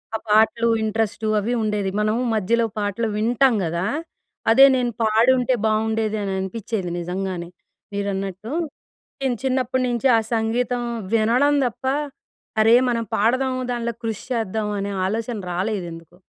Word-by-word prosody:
ఆ - - +1
పాటలు 220 +2 +4 0.2
ఇంట్రెస్టు 220 0 -1
అవి 220 +4 -1
ఉండేది. 210 -2 0
మనం 215 +1 +1 0.2
మధ్యలో 230 +3 +2
పాటలు 205 +2 -1
వింటాం 240 +3 +3
గదా! 170 +2 -1 0.7
అదే 265 +4 +8
నేను 245 -2 0
పాడి 225 +3 +4
ఉంటే 250 +1 +1
బావుండేది 220 0 0
అని 195 -1 -2
అనిపించేది 190 0 -3
నిజంగానే 180 0 -4 0.4
మీరన్నట్టు. 200 +1 -3 0.7
నేను 255 -3 0
చిన్నప్పటి 260 -1 0
నుంచి 240 +1 -1
ఆ - - +4 0.2
సంగీతం 240 +2 0 0.3
వినడం 240 +6 +3
తప్ప, 240 +2 -6 0.8
అరే! 225 +2 +6
మనం 230 -1 0
పాడదాం 255 +5 +2 0.2
దాంట్లో 235 -1 -2
కృషి 220 -3 -3
చేద్దాం 220 -2 -1
అనే 200 0 -3
ఆలోచన 225 +3 -2
రాలేదు 190 +1 -1
ఎందుకో. 165 +1 -13
220 Hz, 130 wpm, -22 LUFS, 200-235 Hz, 0.8 s, అదే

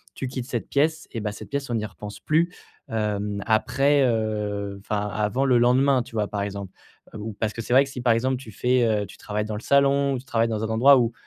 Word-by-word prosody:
tu 135 - -4
quittes 125 -1 -5
cette 120 -4 -3
pièce, 155 +2 +1
et 115 - -4
bah 105 -1 -2
cette - - -10
pièce, 140 -1 -3
on - - 0
n'y 110 -1 -1
repense 105 0 -9
plus. 170 +3 +1 0.4
Hem, 105 -2 -2
après, 135 +6 +3
heu, 105 -3 -1
enfin, 105 0 -2
avant 105 +6 0
le 130 -2 +4
lendemain, 130 +2 +3
tu - - -16
vois, 105 -2 0
par 100 0 -3
exemple. 100 -2 -5 0.4
Heu, - - -5
ou 110 +1 -5
parce 105 +1 -2
que 115 - -5
c'est 115 - -7
vrai 135 - +7
que - - -10
si 130 -2 -6
par 120 -1 +3
exemple 130 +3 +1
tu 125 -3 -9
fais, 125 +4 +1
heu, 105 -2 +1
tu - - -13
travailles 105 0 -3
dans 110 -1 -4
le 105 - -5
salon, 140 +1 +3
ou 130 - -2
tu 130 - -14
travailles 115 -2 +1
dans 110 -1 -2
un 110 - -1
endroit 125 +5 +6
où 115 -1 0
115 Hz, 255 wpm, -24 LUFS, 105-135 Hz, 0.4 s, vrai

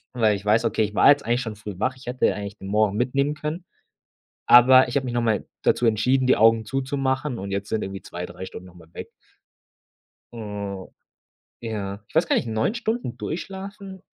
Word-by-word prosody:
Weil 110 -4 +3
ich 100 0 -8
weiß, 110 +3 +3
okay, 110 0 +1
ich 105 0 -3
war - - +5
jetzt 145 0 +4
eigentlich 120 +2 +1
schon 110 -4 -5
früh 105 -1 -8
wach. 130 +4 0
Ich 130 0 -16
hätte 125 +1 +1
ja - - 0
eigentlich 100 0 -7
den 95 - -9
morgen 105 0 +1
mitnehmen 140 +4 0
können. 150 +4 -5 0.8
Aber 130 +1 +8
ich 120 - -6
habe 135 -2 +1
mich 125 - -4
nochmal 115 -3 0 0.2
dazu 120 - +2
entschieden, 125 +4 +2
die 130 - +4
Augen 115 0 +4
zuzumachen 135 +1 -2
und 100 +1 -6
jetzt 100 +1 -3
sind 110 - -1
irgendwie 95 0 -6
2, 90 0 -7
3 90 +1 -9
Stunden 90 -1 -10
nochmal 85 -3 -16
weg. - - -8 1.2
Hm, 100 -4 -6 0.7
ja, 105 -3 -5
ich - - -23
weiß 160 +2 +3
gar - - +1
nicht, 120 - 0
9 110 - 0
Stunden 230 - -3
durchschlafen? 190 +5 -7
115 Hz, 200 wpm, -23 LUFS, 105-135 Hz, 1.2 s, Aber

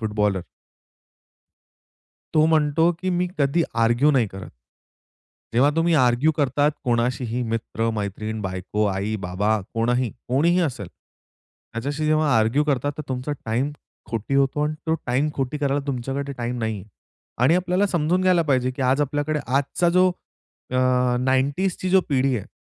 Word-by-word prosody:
Footballer. 105 -4 0 1.9
तो 155 0 +5
म्हणतो 160 +1 +3
की 185 0 -1
मी 180 0 +1
कधी 145 +4 +2 0.2
आर्ग्यु 120 +6 +3
नाही 125 -5 +2
करत. 95 -1 -9 1.0
जेव्हा 135 +5 +4
तुम्ही 165 0 +3
आर्ग्यु 130 +3 +3
करतात 145 +1 +2
कोणाशीही 120 0 0
मित्र-मैत्रीण, 110 -1 -3
बायको, 95 +3 -2
आई, 100 +2 -2
बाबा 105 +4 0
कोणही, 120 +1 +1 0.2
कोणीही 170 +8 +3
असेल. 110 -8 -7 0.8
त्याच्याशी 140 +6 -3
जेव्हा 155 -1 +2
आर्ग्यु 115 +7 +2
करता, 145 -1 0
तर - - -3
तुमचा 130 +3 -3
टाईम 120 +6 0 0.4
खोटी 115 +4 -3
होतो 140 +2 +2
आणि 150 +1 -1
तो 160 - +2
टाईम 130 +5 +1
खोटी 135 +2 -2
करायला 140 0 0
तुमच्याकडे 135 +2 -3
टाईम 120 +1 -3
नाही 110 -1 -1
आहे. 105 - -15 0.5
आणि 150 +7 +5
आपल्याला 180 +2 +1
समजून 175 0 +1
घ्यायला 180 -2 +4
पाहिजे 130 -1 +2
की 130 +1 -5
आज 130 +3 +2
आपल्याकडे 145 +1 -1
आजचा 140 +6 +1
जो 185 +1 +4 0.6
अ, 125 -1 +2
90ज 140 +8 +1
ची 185 - -2
जो 190 - +6
पिढी 135 -2 +2
आहे, 100 - -6
135 Hz, 145 wpm, -23 LUFS, 115-150 Hz, 1.9 s, जो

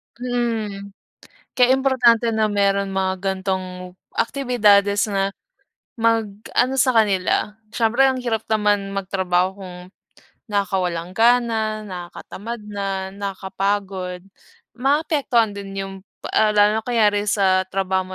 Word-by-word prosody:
Mm, 225 -5 -3 0.6
kaya 250 0 +5
importante 250 -4 +3
na 220 -1 +1
meron 200 -1 +1
mga 190 0 0
ganitong 185 -2 -3 0.2
aktibidades 215 -6 +3
na 195 -1 0 0.7
mag-ano 225 +2 0
sa 255 0 +3
kanila. 210 -1 +1 0.2
Siyempre 235 +3 +2
ang 260 -1 0
hirap 225 -3 -2
naman 205 -2 +1
magtrabaho 190 -1 0
kung 180 -2 -9 0.7
nakakawalang 185 -3 -1
gana, 225 -2 +2
nakatamad 190 +5 -7
na, 195 -2 -4
nakakapagod, 195 -1 -3 0.5
maapektuhan 270 -4 +1
din 200 -1 -7
yung, 195 0 -4 0.4
ah, 215 -1 +4
lalo 210 +1 +3
na - - -23
kunyari 210 -4 +2
sa 190 -2 +3
trabaho 190 -1 -1
205 Hz, 105 wpm, -21 LUFS, 190-230 Hz, 0.7 s, kaya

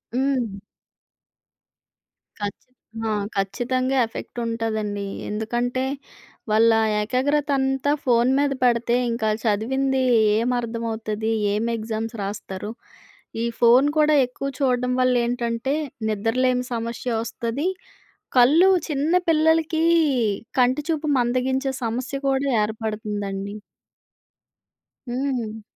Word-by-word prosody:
హ్మ్. 260 -4 0 1.9
ఖచ్చి 205 +4 -5 0.4
ఆ! - - 0 0.3
ఖచ్చితంగా. 255 +7 0
ఎఫెక్ట్ 225 - -9
ఉంటదండి. 220 -3 -2 0.2
ఎందుకంటే 240 +4 -1 0.7
వాళ్ళ 225 +2 +5 0.3
ఏకాగ్రత 280 +6 0
అంతా 270 +1 +1
ఫోను 240 0 +3
మీద 285 -1 +2
పెడితే, 240 -1 +2 0.2
ఇంకా 230 -1 -2
ఆల్లు 215 +1 -3
చదివింది 265 +5 +1 0.4
ఏం 235 +3 +1
అర్థమవుతది? 225 -2 -3 0.2
ఏం 215 +2 0
ఎగ్జామ్స్ 220 +1 -4
రాస్తారు? 200 0 -5 0.7
ఈ - - +1
ఫోను 245 +4 +6
కూడా 305 0 +4
ఎక్కువ 250 +2 -6
చూడడం 250 -2 +1
వల్ల 255 0 +3
ఏంటంటే 235 +2 -1 0.4
నిద్రలేని 250 +4 +1
సమస్య 235 +2 -3
వస్తది. 235 +6 -3 0.7
కళ్ళు 305 +10 +6 0.2
చిన్న 300 +3 0 0.2
పిల్లలకి 320 0 +3 0.8
కంటి 255 +3 +3
చూపు 315 -1 -1
మందగించే 260 +2 0
సమస్య 250 +4 -3
కూడా 270 +1 +1 0.2
ఏర్పడుతుందండి. 210 -2 -4 1.6
హ్మ్. 240 -4 -2
240 Hz, 95 wpm, -23 LUFS, 220-265 Hz, 1.9 s, ఫోను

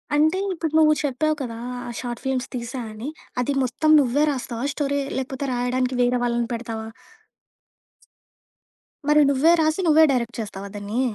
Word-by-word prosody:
అంటే 315 +5 +3
ఇప్పుడు 325 -3 -3
నువ్వు 305 -1 +6
చెప్పావు 300 +3 0
కదా! 230 -3 -5 0.3
ఆ - - -5
షార్ట్ 240 -2 -5
ఫిల్మ్స్ 265 -1 -1
తీశా 250 +1 -4
అని. 225 +7 -6 0.3
అది 280 +3 0
మొత్తం 255 +5 0
నువ్వే 280 +2 +2
రాస్తావా 250 -2 -4
స్టోరీ? 285 -1 -1 0.2
లేకపోతే 265 +1 -3
రాయడానికి 250 +1 0
వేరే 245 0 +2
వాళ్ళని 235 -1 0
పెడతావా? 225 -1 -5 2.2
మరి 300 0 +6
నువ్వే 280 +4 +4
రాసి 315 +4 +1
నువ్వే 315 0 +6
డైరెక్ట్ 240 -2 -1
చేస్తావా 200 -2 -6
దాన్ని? 205 +4 -3
255 Hz, 145 wpm, -23 LUFS, 235-290 Hz, 2.2 s, నువ్వు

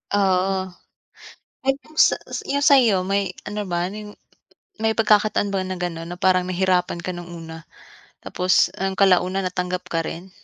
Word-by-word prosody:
Oo, 190 -1 +1 0.9
yung 275 +4 -2
sa - - +5 0.3
yung 285 +1 -1
sa'yo, 245 -8 +6
may 195 -1 0 0.2
ano 210 0 -3
ba 175 -2 -2
yung 210 +1 -9 0.6
may 220 0 +1
pagkakataon 210 -2 +2
ba 195 - 0
na 185 0 -4
ganun 170 -1 -4
na 175 - -6
parang 185 -1 +2
nahirapan 185 -1 +1
ka 175 +2 -5
nung 175 0 -8
una, 165 -1 -10 0.5
tapos, 180 0 +2
ah, 195 0 -1
kalaunan 190 0 +3
natanggap 180 0 -3
ka 165 - 0
rin? 180 +3 -7
185 Hz, 150 wpm, -22 LUFS, 180-205 Hz, 0.9 s, sa'yo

